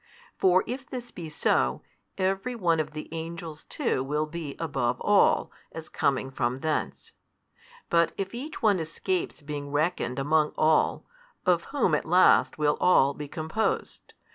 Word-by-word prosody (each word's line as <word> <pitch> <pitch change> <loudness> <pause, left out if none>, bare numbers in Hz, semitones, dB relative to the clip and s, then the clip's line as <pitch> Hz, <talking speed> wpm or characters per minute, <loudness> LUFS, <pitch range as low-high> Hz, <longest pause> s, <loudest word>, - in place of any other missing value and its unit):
For 185 0 +4
if 255 +2 -6
this 245 -2 -7
be 165 -3 -7
so, 65 - +1 0.3
every 195 +6 -1
one 170 -7 +1
of 155 - -2
the 155 - -6
angels 165 -1 -6
too 130 - -1
will 150 +3 -1
be 155 -2 -6
above 130 -7 -1
all, 205 -1 +3 0.2
as 160 -1 -8
coming 135 -1 0
from 125 0 -2
thence. 155 -1 -2 0.8
But 170 -1 +3
if 195 +1 -4
each 280 +6 -7
one 205 -4 +4
escapes 355 - -3
being 145 -1 -5
reckoned 145 -3 -1
among 150 +2 +2
all, 155 0 +2 0.4
of 175 -2 +2
whom 275 - 0
at 150 - +1
last 180 +3 +4
will 150 -1 +2
all 140 -6 +5
be 145 +1 -7
composed? 160 +8 -3
160 Hz, 150 wpm, -27 LUFS, 145-185 Hz, 0.8 s, all